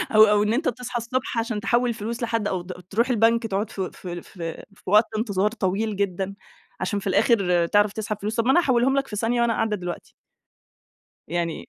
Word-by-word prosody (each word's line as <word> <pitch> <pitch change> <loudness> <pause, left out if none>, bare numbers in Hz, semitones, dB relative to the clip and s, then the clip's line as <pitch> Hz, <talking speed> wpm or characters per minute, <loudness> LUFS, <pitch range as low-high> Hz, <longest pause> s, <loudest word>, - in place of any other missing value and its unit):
أو 215 - +9
أو 210 -1 +4
إن 215 +2 +1
أنت 295 +6 +1
تصحى 250 +1 -4
الصبح 240 +1 -3
عشان 225 -2 -1
تحول 240 +2 +2
الفلوس 230 +2 -4
لحد، 230 -2 0
أو 185 -3 -2
د 180 +1 -9 0.2
تروح 235 +6 +1
البنك 230 0 +3
تقعد 205 +1 -2
في 190 -4 -4
في 175 -2 -7
في 165 -3 -7
في - - -23
وقت 210 +2 +6
انتظار 210 -2 +1
طويل 210 0 -1
جدًا، 195 0 -2 0.4
عشان 205 - -1
في 200 - -6
الآخر 190 -4 +3
تعرف 205 +1 +3
تسحب 215 -1 -3
فلوس، 215 +2 -2
طب 230 0 0
ما 265 - +4
أنا 350 - +5
هاحولهم 265 -2 +2
لك 275 - 0
في 210 - -6
ثانية 235 +3 0
وأنا 235 -1 +2
قاعدة 220 -1 0
دلوقتي. 180 -3 -6 1.2
يعني 170 -1 -3
215 Hz, 205 wpm, -24 LUFS, 195-235 Hz, 1.2 s, أو